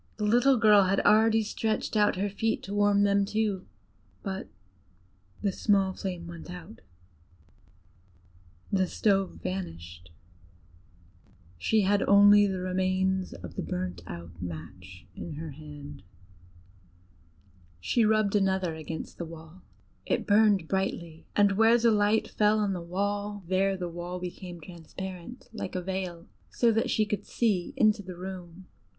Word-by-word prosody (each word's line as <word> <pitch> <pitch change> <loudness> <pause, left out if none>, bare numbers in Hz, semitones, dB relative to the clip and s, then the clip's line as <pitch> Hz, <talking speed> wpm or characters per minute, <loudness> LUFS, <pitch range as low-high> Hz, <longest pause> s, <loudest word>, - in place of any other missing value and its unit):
The 210 - -1
little 245 +5 +4
girl 210 -3 +6
had 195 +1 +2
already 220 +1 +4
stretched 220 +1 -2
out 210 -1 +3
her 195 +3 -1
feet 220 +3 -1
to 195 - -6
warm 205 0 +3
them 200 0 +3
too; 205 -2 -1 0.6
but 190 - -4 1.0
the 200 - +2
small 195 -1 +2
flame 180 -3 -5
went 170 0 -9
out, 180 +4 -10 1.9
the 190 -2 +2
stove 195 -2 0
vanished: 85 - -6 1.5
she 215 - +2
had 200 +1 +2
only 205 +1 +7
the 190 -1 -2
remains 185 0 0
of 90 -1 -9
the - - -3
burnt 90 -1 -4
out 85 0 -9
match 90 +2 -8
in 165 - -7
her 155 +1 -6
hand. 145 -1 -10 1.8
She 230 - +1
rubbed 215 -1 +2
another 190 -4 +1
against 160 0 -7
the 170 - -3
wall: 165 +2 -12 0.5
it - - 0
burned 205 -4 +4
brightly, 170 -4 -3
and 205 -1 +5
where 225 +4 +5
the 235 -1 +3
light 210 +1 +2
fell 210 0 +2
on 205 -2 0
the 180 - -4
wall, 205 +3 -3
there 190 +1 +1
the 180 -1 -3
wall 175 +1 -6
became 180 0 -7
transparent 180 +6 -9
like 190 - -5
a 180 - -1
veil, 185 -2 -4 0.2
so 235 -1 +2
that 225 +1 0
she 215 - +2
could 210 0 -3
see 205 -7 0
into 215 -2 +3
the 185 -2 -9
room. 185 -1 -8
190 Hz, 140 wpm, -28 LUFS, 170-205 Hz, 1.9 s, only